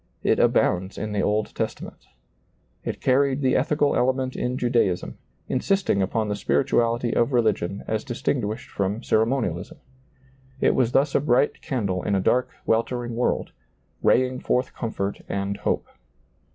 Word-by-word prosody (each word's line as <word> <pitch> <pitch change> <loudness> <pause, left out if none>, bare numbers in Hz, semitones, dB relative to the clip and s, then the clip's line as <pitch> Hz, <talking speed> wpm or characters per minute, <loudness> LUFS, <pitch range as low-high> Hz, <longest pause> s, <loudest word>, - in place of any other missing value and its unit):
It - - +2
abounds 95 +2 +2
in 105 +1 -4
the 105 -1 0
Old 105 +1 0
Testament - - -5 0.8
It - - -4
carried 135 +1 +2
the 130 -2 +2
ethical 145 +2 +2
element 130 +1 +1
in 125 +1 -2
Judaism, 120 -8 0 0.3
insisting 185 - +1
upon 110 +3 0
the 105 - -1
spirituality 120 +2 +1
of 120 +3 +2
religion 105 -5 +1
as 110 0 -1
distinguished 115 -2 -2
from 100 +4 -2
ceremonialism. 110 -7 0 0.8
It - - +3
was 125 -2 +1
thus 140 +1 +3
a - - +4
bright 135 0 +2
candle 100 -9 -2
in 100 - 0
a - - +2
dark, 125 +6 +2 0.2
weltering 120 +1 0
world, 120 - 0 0.5
raying 130 0 +3
forth 125 +1 0
comfort 100 -4 -3
and 100 0 -2
hope. - - -1
120 Hz, 140 wpm, -24 LUFS, 105-130 Hz, 0.8 s, a